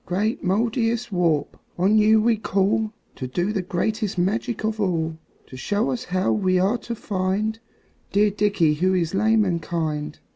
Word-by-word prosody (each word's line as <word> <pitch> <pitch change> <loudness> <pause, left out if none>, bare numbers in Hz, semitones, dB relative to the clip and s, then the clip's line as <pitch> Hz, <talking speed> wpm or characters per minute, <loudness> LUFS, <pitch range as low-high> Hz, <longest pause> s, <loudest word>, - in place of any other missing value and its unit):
"Great 205 +6 -1
Mouldiestwarp, 220 - 0 0.2
on 190 +4 +3
you 215 +1 +5
we 225 +1 +3
call 215 +1 0 0.3
To 130 - -4
do 175 +10 -1
the 195 - 0
greatest 205 +3 -2
magic 205 +5 -1
of 220 0 -1
all; 165 -4 -1 0.3
To - - -12
show 205 - -1
us 250 0 -4
how 185 -1 0
we 185 -3 +2
are 200 +6 +2
to 235 - -5
find 205 +2 -2 0.5
Dear 205 +1 +3
Dickie 200 -6 +2
who 185 +5 +1
is 170 -2 0
lame 215 +2 +3
and 170 -3 -1
kind. 155 -2 -3
200 Hz, 160 wpm, -23 LUFS, 175-220 Hz, 0.5 s, you